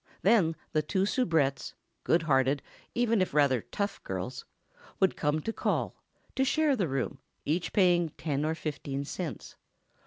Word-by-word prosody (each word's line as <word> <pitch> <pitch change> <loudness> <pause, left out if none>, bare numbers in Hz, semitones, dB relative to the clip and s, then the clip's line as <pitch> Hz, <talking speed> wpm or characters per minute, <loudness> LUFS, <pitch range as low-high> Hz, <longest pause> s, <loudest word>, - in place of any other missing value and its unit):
Then 190 -6 +4 0.2
the 155 - +2
two 190 +4 0
soubrettes—good 165 - 0
hearted, 135 -2 +2 0.3
even 230 -3 +2
if 185 - -1
rather 140 -5 +4
tough, 200 - -4
girls—would 125 - -4
come 150 +1 0
to 225 - -3
"call," - - -1 0.3
to 265 - +2
share 300 +1 +3
the 195 -8 0
room, 135 -3 -2 0.3
each 165 +4 0
paying 175 -4 +4
ten 145 -2 -1
or 160 +1 0
fifteen 140 -3 -4
cents. 150 - -6
160 Hz, 135 wpm, -29 LUFS, 140-195 Hz, 0.3 s, Then